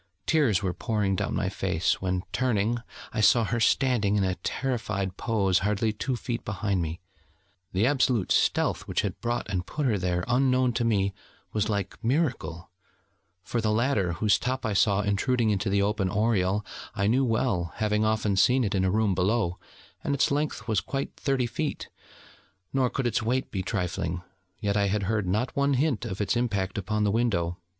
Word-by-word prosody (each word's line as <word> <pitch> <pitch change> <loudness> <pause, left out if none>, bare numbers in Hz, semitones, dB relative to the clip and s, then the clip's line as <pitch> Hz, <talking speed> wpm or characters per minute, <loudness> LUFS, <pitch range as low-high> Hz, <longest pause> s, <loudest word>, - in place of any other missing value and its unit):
Tears 130 - +2
were 90 -2 0
pouring 105 0 0
down - - -2
my 100 - 0
face, 95 -3 0
when, 95 -1 -1
turning, 120 -2 +1 0.3
I 110 - 0
saw 115 +2 +5
her 115 +2 -1
standing 115 -4 +2
in 100 - +2
a 95 -1 +1
terrified 105 -1 -2
pose 100 -5 +1
hardly 105 +2 0
two 130 +4 -2
feet 120 0 -4
behind 100 -2 -1
me. 80 0 -4 0.7
The 95 +4 +2
absolute 125 -6 +2
stealth - - +2
which - - 0
had - - -4
brought 120 +1 -2
and 95 -4 -1
put 150 +9 -3
her 110 -6 +2
there, 90 -1 0
unknown 130 0 +2
to 120 - 0
me, 100 -4 +1 0.4
was 105 0 0
like 100 +1 -3
miracle: 120 - -1 0.7
for 115 +7 -2
the 110 -1 +1
ladder, 110 -6 +1
whose 100 +5 +2
top 130 +1 -2
I 110 - 0
saw 100 0 +3
intruding 110 +3 +1
into 100 0 0
the 100 0 +2
open 100 -2 0
oriel, 105 -1 +1 0.3
I 100 - 0
knew 125 +6 +3
well, 110 -8 0
having 105 0 +1
often 110 -2 +1
seen 125 +6 +4
it 100 - -1
in 95 -2 +1
a 95 - +2
room 105 0 +2
below, 95 0 0 0.4
and 140 - 0
its 140 - +2
length 145 -6 -1
was 110 -5 +1
quite 135 0 -4
thirty 135 -3 0
feet, 145 +6 -3 0.8
nor 130 -2 +2
could 135 - -2
its 120 0 +1
weight 125 +4 -1
be 95 - -2
trifling: 90 -3 -2 0.4
yet 100 -1 0
I 100 -1 +2
had 100 +1 0
heard 105 -1 0
not 110 +7 -1
one 140 0 +2
hint 130 -5 0
of 95 - -5
its 105 +4 +1
impact 100 -5 -1
upon 105 +2 -1
the 105 - +2
window. 90 -7 0
105 Hz, 185 wpm, -27 LUFS, 95-120 Hz, 0.8 s, saw